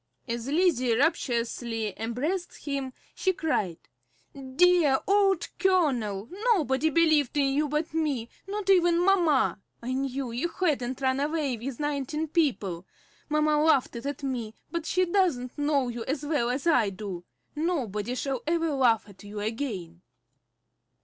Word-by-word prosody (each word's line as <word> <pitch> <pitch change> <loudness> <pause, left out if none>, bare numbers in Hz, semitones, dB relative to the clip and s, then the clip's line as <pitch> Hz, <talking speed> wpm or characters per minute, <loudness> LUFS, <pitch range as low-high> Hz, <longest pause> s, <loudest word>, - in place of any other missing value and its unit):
As 235 +1 -3
Lizzie 280 -7 +2
rapturously 235 - 0
embraced 285 +12 -3
him, 275 -2 -2 0.2
she 375 - 0
cried: 210 - -1 0.6
"Dear 280 +2 +3
old 390 -3 +3
Colonel, 250 - +1 0.3
nobody 300 -3 +1
believed 310 -3 +3
in 275 -1 +2
you 295 +1 +1
but 305 +2 -2
me, 290 -8 -1 0.2
not 405 0 -4
even 345 -2 +4
mamma! 325 - +3 0.2
I 250 +2 -4
knew 265 -1 -2
you 245 +8 -1
hadn't 275 -8 -1
run 260 0 +1
away 295 -2 0
with 240 +2 -6
nineteen 295 +1 -2
people. 210 - 0 0.4
Mamma 305 0 +2
laughed 295 -6 +3
at 280 +4 -5
me, 240 -5 -3 0.2
but 335 -2 -3
she 370 0 +2
doesn't 340 -10 0
know 290 -3 +1
you 235 -1 -5
as 285 +2 -3
well 290 -6 0
as 260 +5 -2
I 245 -11 +4
do. 190 -2 -6 0.3
Nobody 250 - -2
shall 265 -1 -2
ever 330 -1 +1
laugh 240 -6 +2
at 200 -1 -15
you 205 +1 -7
again." 205 -7 -4
275 Hz, 140 wpm, -27 LUFS, 235-320 Hz, 0.6 s, even